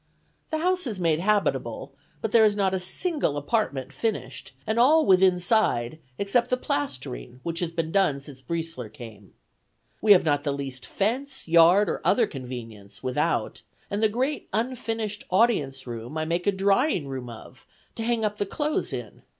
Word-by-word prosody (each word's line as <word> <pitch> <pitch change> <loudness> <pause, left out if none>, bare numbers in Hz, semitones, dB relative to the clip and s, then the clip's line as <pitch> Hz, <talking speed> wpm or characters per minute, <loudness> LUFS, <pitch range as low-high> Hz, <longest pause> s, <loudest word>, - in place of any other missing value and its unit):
The 315 - -1
house 360 0 0
is 210 -5 -4
made 165 -3 +2
habitable, 205 +2 0 0.3
but - - -1
there 230 -1 +6
is 210 -1 +4
not 195 -2 +1
a 190 - 0
single 190 - -1
apartment 145 - -1
finished, 200 - -3
and 220 +2 0
all 305 +6 +5
withinside, 180 - +3 0.2
except 200 +5 +1
the 250 - +2
plastering, 130 - -4 0.2
has 175 -2 -1
been 165 -1 -2
done 190 -8 +2
since 135 -1 -11
Briesler 165 -8 -4
came. 110 -4 -12 0.7
We 210 -1 +8
have 180 - +3
not 145 -2 +2
the 145 - 0
least 135 -2 -6
fence, 265 +6 -2
yard, 170 +5 +6
or - - -2
other 240 - +4
convenience, 120 - -9
without, 130 -1 -1 0.3
and 200 +1 -1
the 220 - +4
great 260 +7 -2
unfinished 225 -2 -2
audience 155 - +2
room 120 +4 -6
I 155 - -1
make 170 +3 -1
a - - +5
drying 195 - +1
room 130 -2 -5
of, 120 +2 -12 0.3
to - - -6
hang 230 -1 0
up 210 0 -2
the 205 - 0
clothes 295 +8 -1
in. 120 -5 -7
185 Hz, 165 wpm, -26 LUFS, 135-220 Hz, 0.7 s, We